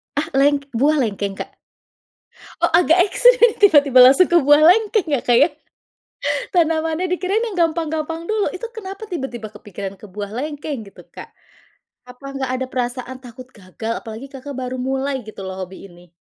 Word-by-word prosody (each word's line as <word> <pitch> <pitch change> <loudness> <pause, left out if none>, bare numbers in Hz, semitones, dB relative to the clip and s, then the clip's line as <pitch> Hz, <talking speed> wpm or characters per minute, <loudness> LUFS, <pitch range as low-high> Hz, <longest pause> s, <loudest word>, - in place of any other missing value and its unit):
Ah, 305 +2 -1
leng 285 0 +3
buah 280 +6 +2
lengkeng, 200 -4 -2
Kak? - - -7 1.1
Oh, - - +3
agak 340 -1 +4
ekstrim 485 +2 +4
tiba-tiba 290 -10 +5
langsung 270 +9 +6
ke 345 - +6
buah 290 +1 +5
lengkeng 425 -1 +2
ya, 280 - +2
Kak, 240 -1 +3
ya? 300 - +5 1.0
Tanamannya 325 0 +1
dikirain 375 +5 0
yang 405 -5 -6
gampang-gampang 320 0 -4
dulu, 430 0 0
itu 375 +5 -6
kenapa 400 0 -8
tiba-tiba 265 - -6
kepikiran 200 -1 -8
ke 210 - -12
buah 205 +1 -6
lengkeng 290 -1 -5
gitu, - - -15
Kak? - - -12 0.8
Apa 250 +3 -13
nggak 265 -1 -3
ada 260 - -3
perasaan 250 0 -4
takut 250 0 -12
gagal? 215 +3 -6
Apalagi 225 +4 -9
Kakak 275 +1 -9
baru 255 0 -4
mulai 265 0 -2
gitu 215 -2 -10
loh 190 0 -5
hobi 190 +2 -12
ini. 175 0 -18
275 Hz, 165 wpm, -20 LUFS, 240-335 Hz, 1.1 s, langsung